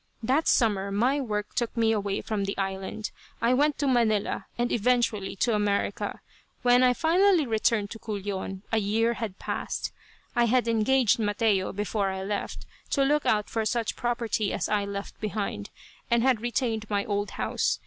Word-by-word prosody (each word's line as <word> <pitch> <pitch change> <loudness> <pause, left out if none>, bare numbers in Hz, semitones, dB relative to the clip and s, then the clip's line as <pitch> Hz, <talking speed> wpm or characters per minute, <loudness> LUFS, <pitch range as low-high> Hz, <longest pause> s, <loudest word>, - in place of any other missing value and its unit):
That 270 +8 +2
summer 200 -4 +2
my 245 +8 +2
work 210 -5 -3
took 235 0 -2
me 225 -1 +3
away 200 -2 -1
from 210 -3 -2
the 200 - -3
island. 195 +2 -3 0.3
I 235 +2 +3
went 290 +3 +2
to 285 - 0
Manila, 225 -5 +1
and 240 0 0
eventually 230 -4 +1
to 235 +4 +1
America. 205 -1 -1 0.4
When 245 0 +5
I 250 -1 +4
finally 345 +1 +4
returned 220 -2 +1
to 225 - -7
Culion 195 -3 -4
a 225 - +3
year 225 +3 +1
had 220 -5 -5
passed. - - -3 0.4
I 240 - +4
had 245 +1 +2
engaged 230 +1 +3
Mateo, 205 -2 +1
before 205 0 -1
I 190 0 -4
left, 205 +1 -4 0.2
to 275 - +2
look 295 +1 +2
out 210 -1 +2
for 225 - -1
such 225 +1 -1
property 235 -3 -1
as - - -1
I 205 -1 +1
left 200 0 -6
behind, 205 - -3 0.4
and 235 0 +3
had 255 -4 +3
retained 230 -2 -1
my 200 -1 0
old 205 -1 -1
house. - - 0
220 Hz, 170 wpm, -27 LUFS, 205-240 Hz, 0.4 s, When